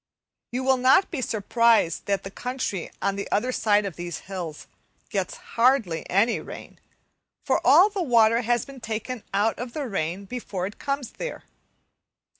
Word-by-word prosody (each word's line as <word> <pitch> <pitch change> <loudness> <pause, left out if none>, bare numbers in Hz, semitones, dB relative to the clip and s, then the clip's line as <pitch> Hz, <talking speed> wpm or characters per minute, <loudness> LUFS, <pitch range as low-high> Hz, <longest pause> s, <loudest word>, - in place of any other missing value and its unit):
You 250 +2 -2
will 265 0 +3
not 260 +9 +4
be 305 -7 -3
surprised 225 -5 +2
that 200 -1 0
the 195 - -7
country 250 -7 -3
on 200 0 0
the 200 - -5
other 240 +5 +1
side 210 -4 +2
of 190 -5 -5
these 175 -2 -5
hills 180 -5 -6 0.5
gets - - -2 0.2
hardly 230 - +2
any 220 +5 +3
rain, - - -10 0.7
for - - +2
all 380 - +7
the 395 -1 -2
water 230 -5 +4
has 240 -1 +1
been 275 -2 -12
taken 225 +2 -4
out 205 +3 +1
of 240 0 -5
the 305 - -3
air 185 - -2
before 195 -4 -4
it 205 - -7
comes 275 -3 -3
there. - - -6
230 Hz, 165 wpm, -25 LUFS, 195-255 Hz, 0.7 s, all